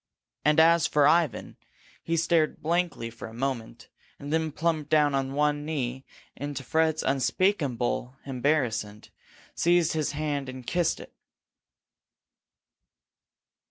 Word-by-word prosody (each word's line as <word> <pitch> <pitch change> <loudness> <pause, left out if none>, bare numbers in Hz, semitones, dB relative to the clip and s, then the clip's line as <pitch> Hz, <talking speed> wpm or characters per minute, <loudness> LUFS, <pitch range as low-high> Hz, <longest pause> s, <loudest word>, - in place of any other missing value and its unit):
And 150 +2 +4
as 165 0 +5
for 145 -1 +4
Ivan, 165 -6 +1 0.4
he 165 0 -1
stared 165 -1 +2
blankly 165 -8 -1
for 115 - -9
a 110 - -12
moment, 120 -2 -4 0.3
and 145 +1 -6
then 160 -1 0
plumped 155 -1 -1
down 150 -2 +3
on 135 0 -1
one 145 0 +1
knee 135 -4 -3 0.3
and, 145 +1 -5
to 135 - -5
Fred's 160 +3 +1
unspeakable 135 - 0
embarrassment, 125 -6 -1 0.4
seized 175 -1 +2
his 155 -2 -1
hand 145 -2 -2
and 130 -1 -8
kissed 175 +3 0
it. - - -12
145 Hz, 125 wpm, -27 LUFS, 130-160 Hz, 0.4 s, as